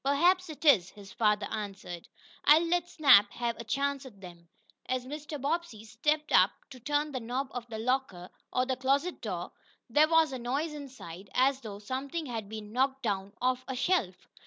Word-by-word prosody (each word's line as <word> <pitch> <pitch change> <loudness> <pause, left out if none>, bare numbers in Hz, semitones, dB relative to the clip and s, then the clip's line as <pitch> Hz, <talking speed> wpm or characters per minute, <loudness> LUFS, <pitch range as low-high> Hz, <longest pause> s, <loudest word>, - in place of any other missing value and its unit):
"Perhaps 350 +6 +3
it 310 +1 -9
is," 195 - +6
his 200 -2 -13
father 210 -2 +2
answered. 195 -5 -6 0.4
"I'll 310 +3 +7
let 350 +1 0
Snap 270 - +6
have 235 -1 -2
a - - -6
chance 275 +4 -1
at 235 -7 -13
them." 170 -3 -13 0.4
As 255 -1 -1
Mr. 295 +2 -6
Bobbsey 280 -6 -2
stepped 300 +8 -1
up - - +6 0.2
to 255 - -10
turn 290 +4 -1
the 260 - -3
knob 250 +3 -3
of 245 -1 -6
the 225 -2 -6
"locker," 225 -7 -2 0.2
or 255 - +1
closet 270 +6 0
door, - - -4 0.4
there 295 +6 +4
was 325 -3 +4
a 260 - -4
noise 280 +7 -2
inside, 250 - -9
as 265 +1 +3
though 210 -4 -7
something 265 +9 -4
had 225 -6 -5
been 215 -1 -7
knocked 265 +1 +1
down 200 -2 -2
off 255 0 0
a 260 - -3
shelf. 245 - 0
255 Hz, 185 wpm, -30 LUFS, 215-290 Hz, 0.4 s, I'll